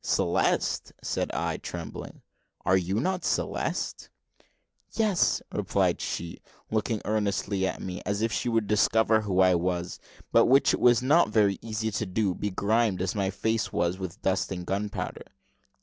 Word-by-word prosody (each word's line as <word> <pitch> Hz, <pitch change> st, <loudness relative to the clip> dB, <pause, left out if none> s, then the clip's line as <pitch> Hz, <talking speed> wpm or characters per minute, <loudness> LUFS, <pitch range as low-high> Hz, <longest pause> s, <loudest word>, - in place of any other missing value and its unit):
"Celeste," -, -, 0 dB
said -, -, -2 dB
I, -, -, -2 dB
trembling. -, -, -8 dB, 0.4 s
"Are 95 Hz, -, +4 dB
you 95 Hz, +1 st, 0 dB
not 185 Hz, +7 st, -1 dB
Celeste?" -, -, -2 dB, 0.8 s
"Yes," 215 Hz, -5 st, +2 dB
replied -, -, 0 dB
she, 85 Hz, 0 st, -4 dB, 0.3 s
looking 110 Hz, 0 st, -1 dB
earnestly 100 Hz, -2 st, 0 dB
at -, -, -5 dB
me, 90 Hz, -1 st, -5 dB
as 100 Hz, +1 st, -1 dB
if 115 Hz, -, +1 dB
she 120 Hz, -, -1 dB
would 115 Hz, -2 st, +1 dB
discover 110 Hz, +1 st, +3 dB
who 95 Hz, -3 st, +1 dB
I 95 Hz, -1 st, +5 dB
was, 90 Hz, 0 st, -1 dB, 0.3 s
but -, -, +5 dB
which 135 Hz, +2 st, +5 dB
it -, -, 0 dB
was 120 Hz, -1 st, +4 dB
not 150 Hz, +1 st, +4 dB
very 105 Hz, -3 st, +2 dB
easy 110 Hz, 0 st, -3 dB
to 105 Hz, +1 st, -2 dB
do, 95 Hz, 0 st, 0 dB
begrimed 105 Hz, +1 st, 0 dB
as 95 Hz, 0 st, -1 dB
my 100 Hz, -2 st, 0 dB
face 110 Hz, +3 st, -1 dB
was 85 Hz, +2 st, 0 dB
with 95 Hz, -3 st, -6 dB
dust 95 Hz, 0 st, 0 dB
and 90 Hz, -2 st, -4 dB
gunpowder. 100 Hz, 0 st, -3 dB
105 Hz, 155 wpm, -27 LUFS, 95-110 Hz, 0.8 s, I